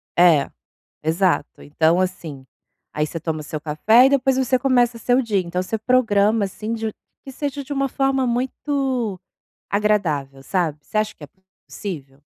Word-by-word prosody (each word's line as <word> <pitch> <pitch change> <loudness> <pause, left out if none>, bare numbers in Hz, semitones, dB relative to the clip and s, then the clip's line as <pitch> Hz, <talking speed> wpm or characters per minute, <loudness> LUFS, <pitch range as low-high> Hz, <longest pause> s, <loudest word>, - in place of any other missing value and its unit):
É, 170 -5 +5 0.5
exato. 170 +4 0
Então 160 +4 +2
assim, 160 -7 -4 0.5
aí 150 0 0
você 165 +2 -6
toma 160 -1 -3
o - - -6
seu 150 0 -6
café 205 - +4
e - - +5
depois 270 -1 +2
você 260 -1 +2
começa 245 -2 +2
seu 245 +2 +2
dia. 215 -5 0
Então 180 0 -3
você 220 +4 -3
programa, 220 -3 +2
assim, 215 +3 -6
de 220 -1 -3 0.3
que 270 - -8
seja 285 +1 -4
de 275 +1 -7
uma 275 -1 0
forma 270 0 +1
muito 250 -3 -1 0.5
agradável, 170 -10 0
sabe. 170 -3 -1
Você 215 - -5
acha 215 0 0
que - - -14
é - - -8 0.4
possível? 140 -8 -7
210 Hz, 165 wpm, -21 LUFS, 160-250 Hz, 0.5 s, É